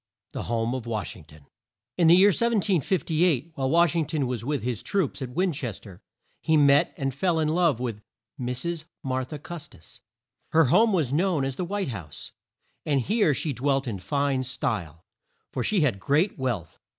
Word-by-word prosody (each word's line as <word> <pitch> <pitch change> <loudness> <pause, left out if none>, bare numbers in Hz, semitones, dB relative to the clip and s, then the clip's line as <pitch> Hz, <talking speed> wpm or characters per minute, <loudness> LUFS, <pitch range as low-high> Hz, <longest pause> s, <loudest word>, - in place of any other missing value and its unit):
THE - - -5
HOME 115 +1 0
OF 125 -3 -5
WASH 110 -2 -3
ING 80 - -14
TON. 75 -1 -17 0.5
In 170 -2 +3
the 170 - +8
year 195 +3 +7
1758, 180 - +1
while 135 -3 -1
Wash 170 +1 +4
ing 165 -3 +1
ton 155 -4 -1
was 125 -2 -3
with 145 0 -2
his 120 -4 -2
troops 185 -8 -1
at 130 - -4
Win 180 +8 0
ches 120 -7 -4
ter, 95 -2 -14 0.4
he 160 -1 +3
met 145 -1 +5
and 135 -1 -2
fell 165 +4 +1
in 155 - +1
love 165 -6 +2
with 115 -4 -4 0.4
Mrs. 155 +7 -3 0.2
Mar 130 -1 -1
tha 150 +4 -7
Cus 165 +2 -8
tis. 80 - -18 0.5
Her 160 0 +6
home 225 +1 +5
was 155 -9 0
known 165 -3 +1
as 135 -1 -3
the 180 - -3
White 195 -2 -2
House, 90 - -7 0.5
and 145 -3 +1
here 200 - +2
she 150 +1 -2
dwelt 135 +2 0
in 105 -5 -3
fine 140 +4 0
style, 95 -10 -3 0.5
for - - -2
she 210 -5 +2
had 125 -10 +1
great 150 - +1
wealth. 120 - -3
140 Hz, 190 wpm, -26 LUFS, 125-170 Hz, 0.5 s, the